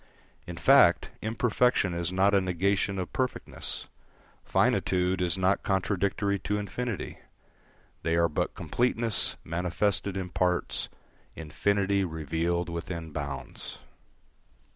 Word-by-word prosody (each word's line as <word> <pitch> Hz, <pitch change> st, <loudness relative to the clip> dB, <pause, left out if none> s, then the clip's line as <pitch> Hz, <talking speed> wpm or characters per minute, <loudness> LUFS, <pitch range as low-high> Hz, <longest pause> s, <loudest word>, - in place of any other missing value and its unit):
In -, -, -6 dB
fact, -, -, +5 dB
imperfection 115 Hz, -3 st, +2 dB
is 85 Hz, 0 st, -2 dB
not 95 Hz, +2 st, +3 dB
a 100 Hz, -, +5 dB
negation 95 Hz, +2 st, 0 dB
of 90 Hz, -2 st, -4 dB
perfectness; 130 Hz, -1 st, -3 dB, 0.6 s
finitude 90 Hz, 0 st, +2 dB
is 90 Hz, -1 st, +1 dB
not 95 Hz, +1 st, +2 dB
contradictory 100 Hz, +1 st, 0 dB
to 105 Hz, +2 st, -1 dB
infinity: 105 Hz, +2 st, -4 dB, 0.8 s
they 80 Hz, 0 st, +1 dB
are 85 Hz, 0 st, +4 dB
but 75 Hz, -, -2 dB
completeness 120 Hz, -2 st, 0 dB
manifested 90 Hz, +3 st, 0 dB
in 95 Hz, -1 st, -3 dB
parts, 90 Hz, 0 st, 0 dB, 0.5 s
infinity 100 Hz, +5 st, +1 dB
revealed 85 Hz, +1 st, -1 dB
within 85 Hz, -1 st, -5 dB
bounds. 70 Hz, -4 st, -6 dB
95 Hz, 105 wpm, -28 LUFS, 85-100 Hz, 0.8 s, fact